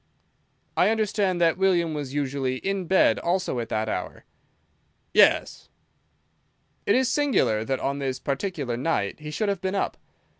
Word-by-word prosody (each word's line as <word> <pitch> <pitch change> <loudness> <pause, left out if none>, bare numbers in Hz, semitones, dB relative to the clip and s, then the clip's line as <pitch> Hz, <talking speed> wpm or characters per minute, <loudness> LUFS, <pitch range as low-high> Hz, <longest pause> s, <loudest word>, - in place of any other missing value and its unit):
"I - - +4
understand 205 -4 0
that 165 +1 +3
William 175 -4 +2
was 145 -3 -4
usually 135 -2 -1
in 190 +6 -3
bed 190 +2 +4
also 175 -7 -1
at 115 -1 -4
that 110 0 -1
hour." - - -5 0.9
"Yes." - - +3 1.2
"It 200 - +4
is 260 0 +3
singular 260 - +1
that 130 +3 -2
on 140 +1 -2
this 135 -2 -2
particular 140 -4 -3
night 125 -6 -1
he 150 0 -7
should 210 +8 -2
have 200 -3 -1
been 190 +1 -2
up. - - -1
165 Hz, 150 wpm, -25 LUFS, 135-195 Hz, 1.2 s, I